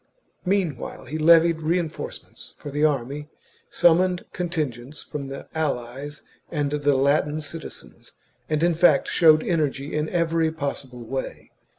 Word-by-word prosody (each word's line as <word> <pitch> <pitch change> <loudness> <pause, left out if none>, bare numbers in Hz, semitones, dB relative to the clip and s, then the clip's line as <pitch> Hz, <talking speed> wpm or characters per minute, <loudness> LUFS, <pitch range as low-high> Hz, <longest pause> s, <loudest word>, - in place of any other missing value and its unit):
Meanwhile, 180 -8 -1
he 155 +5 -4
levied 165 +1 +5
reinforcements 165 0 -4
for 145 - -8
the 145 +2 -1
army, 145 0 0 0.4
summoned 175 +1 +3
contingents 150 -7 -3
from 140 -2 -6
the 135 0 -8
allies 145 -1 -3 0.3
and 145 -3 -1
the 145 -1 +2
Latin 145 +3 +2
citizens, 155 +2 -10 0.4
and 155 +1 +1
in 175 0 +4
fact 165 -4 +4
showed 155 -2 +5
energy 145 -4 -1
in 150 +1 -1
every 165 -2 +1
possible 140 -5 -5
way. 130 +3 -5
155 Hz, 125 wpm, -24 LUFS, 140-165 Hz, 0.4 s, levied